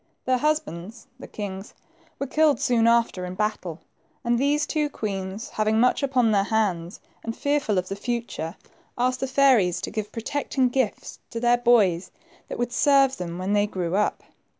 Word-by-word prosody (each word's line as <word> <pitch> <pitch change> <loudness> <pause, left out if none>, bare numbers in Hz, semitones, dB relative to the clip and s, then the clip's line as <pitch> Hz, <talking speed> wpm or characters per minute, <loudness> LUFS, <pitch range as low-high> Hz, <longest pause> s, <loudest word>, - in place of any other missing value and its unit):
Their 255 -1 +2
husbands, 225 - -2
the - - -9
kings, 195 -1 -7 0.4
were 275 - -2
killed 305 +1 +3
soon 245 -5 +2
after 230 -5 +2
in 180 0 -5
battle, 200 -5 -3 0.4
and 235 0 +1
these 290 +2 +2
two 300 -2 -1
queens, 195 -3 -4
having 215 +1 +1
much 250 +4 +3
upon 255 -5 +2
their 200 -1 +3
hands, 195 -5 -1 0.2
and 225 0 -5
fearful 285 -8 0
of 185 0 0
the 195 - -4
future, 225 -7 -4 0.4
asked 255 +1 +1
the 265 - -1
fairies 255 -10 +4
to - - -4
give 215 -1 -4
protecting 260 +2 -1
gifts 250 -4 -2
to 230 - -4
their 240 +1 +3
boys, 215 -8 +3 0.4
that - - -6
would 240 0 -2
serve 275 0 +4
them 175 -1 -5
when 185 +3 -2
they 205 0 +3
grew 180 -3 -2
up. 210 +1 0
225 Hz, 175 wpm, -25 LUFS, 195-255 Hz, 0.4 s, fairies